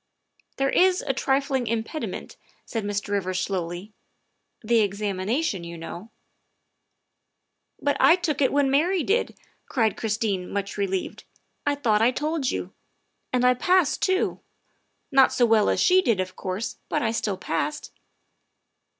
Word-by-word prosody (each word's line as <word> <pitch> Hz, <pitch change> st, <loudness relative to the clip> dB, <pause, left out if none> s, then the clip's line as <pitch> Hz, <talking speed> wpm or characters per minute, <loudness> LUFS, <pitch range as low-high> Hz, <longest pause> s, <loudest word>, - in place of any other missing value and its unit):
" -, -, -40 dB
There 270 Hz, 0 st, +1 dB
is 370 Hz, 0 st, +3 dB
a 270 Hz, -, 0 dB
trifling 270 Hz, -1 st, 0 dB
impediment," 230 Hz, +7 st, -4 dB, 0.3 s
said 225 Hz, -2 st, -3 dB
Mr. 205 Hz, 0 st, -3 dB
Rivers 185 Hz, -2 st, -1 dB
slowly, 185 Hz, +1 st, -4 dB, 0.3 s
" -, -, -51 dB
the 230 Hz, +1 st, +3 dB
examination, 200 Hz, -, -1 dB
you 170 Hz, 0 st, -7 dB
know." 170 Hz, +5 st, -8 dB, 0.8 s
" -, -, -54 dB
But 285 Hz, -, +1 dB
I 335 Hz, -, +7 dB
took 315 Hz, -6 st, -2 dB
it 265 Hz, -, +3 dB
when 280 Hz, -1 st, +2 dB
Mary 335 Hz, +5 st, +2 dB
did," 440 Hz, +9 st, 0 dB, 0.3 s
cried 225 Hz, -5 st, +1 dB
Christine, 210 Hz, -4 st, -2 dB
much 200 Hz, 0 st, -3 dB
relieved. 195 Hz, -2 st, -3 dB, 0.2 s
" -, -, -19 dB
I 290 Hz, -, +2 dB
thought 225 Hz, -7 st, +2 dB
that 225 Hz, -, +4 dB
I -, -, +5 dB
told 295 Hz, +1 st, -1 dB
you. -, -, -4 dB, 0.6 s
And 250 Hz, 0 st, +2 dB
I 250 Hz, -, +6 dB
passed 350 Hz, +4 st, +2 dB
too; 375 Hz, 0 st, +1 dB, 0.7 s
not 270 Hz, -1 st, +6 dB
so 245 Hz, -, +3 dB
well 220 Hz, -2 st, +4 dB
as -, -, +1 dB
she 370 Hz, +1 st, +5 dB
did, 230 Hz, -, +1 dB
of 185 Hz, 0 st, -3 dB
course, 190 Hz, +4 st, -4 dB
but 235 Hz, -, 0 dB
still 210 Hz, -3 st, -1 dB
I -, -, -15 dB
passed." 295 Hz, -, -2 dB
230 Hz, 160 wpm, -25 LUFS, 200-285 Hz, 0.8 s, I